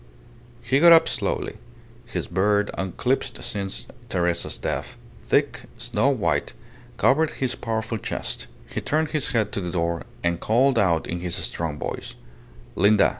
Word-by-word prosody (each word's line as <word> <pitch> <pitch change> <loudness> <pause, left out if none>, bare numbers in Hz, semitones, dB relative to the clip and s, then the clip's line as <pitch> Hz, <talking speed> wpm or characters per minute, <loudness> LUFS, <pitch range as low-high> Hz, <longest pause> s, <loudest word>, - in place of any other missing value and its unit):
He 135 - +2
got 170 +2 +9
up 165 0 +7
slowly. 120 -6 -2 0.5
His - - -3
beard, 105 +3 +2
unclipped 125 +7 -1
since 100 -2 -3 0.2
Teresa's 85 -3 0
death, - - -3 0.2
thick, - - +1
snow - - +1
white, - - 0 0.4
covered 155 +4 +4
his 130 -2 0
powerful 110 -2 -3
chest. - - -4 0.2
He - - -4
turned 155 +1 0
his 155 -3 -1
head 110 -5 +1
to 100 - -2
the 90 - -3
door, 85 -1 -1 0.2
and 85 0 +1
called 125 +4 +3
out 85 -5 +2
in 85 - -3
his 90 -1 -2
strong 80 -3 -3
voice - - -5 0.6
"Linda." 100 +3 +5
105 Hz, 145 wpm, -24 LUFS, 90-130 Hz, 0.6 s, got